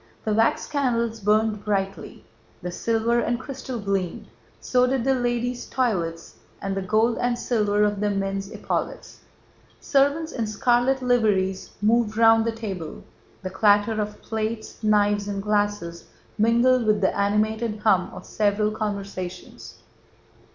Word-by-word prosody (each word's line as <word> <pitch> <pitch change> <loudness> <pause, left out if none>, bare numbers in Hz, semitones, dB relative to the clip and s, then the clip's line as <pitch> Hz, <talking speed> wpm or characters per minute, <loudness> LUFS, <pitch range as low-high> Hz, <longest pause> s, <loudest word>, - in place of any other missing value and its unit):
The 215 - +1
wax 225 +2 +2
candles 235 -6 -1
burned 210 +1 +1
brightly, 195 -3 -3 0.4
the 180 - -3
silver 230 +4 +1
and 235 +1 -1
crystal 260 -2 -6
gleamed, 195 -4 -3 0.3
so 250 0 +2
did 260 -2 0
the 270 +1 +3
ladies' 245 0 -2
toilets 180 -11 -2 0.2
and 195 0 -3
the 195 - -2
gold 220 +4 +1
and 245 0 0
silver 210 -4 +1
of 205 -1 +1
the 210 0 +1
men's 195 0 -2
epaulets; - - -4 0.6
servants 285 +3 +1
in 230 -3 -2
scarlet 245 +5 +1
liveries 205 -6 +1
moved 220 0 +2
round 225 0 +5
the 230 - +1
table, 195 -8 -6 0.4
the 185 - -4
clatter 205 +2 +3
of 210 0 -5
plates, 220 0 -4
knives, 205 -1 +2
and 200 -1 -3
glasses 205 -5 -1 0.3
mingled 235 +2 +3
with 210 -1 +3
the 190 - +1
animated 215 +2 0
hum 195 -4 +3
of - - -10
several 210 0 +1
conversations. 200 -4 -6
215 Hz, 135 wpm, -24 LUFS, 200-235 Hz, 0.6 s, round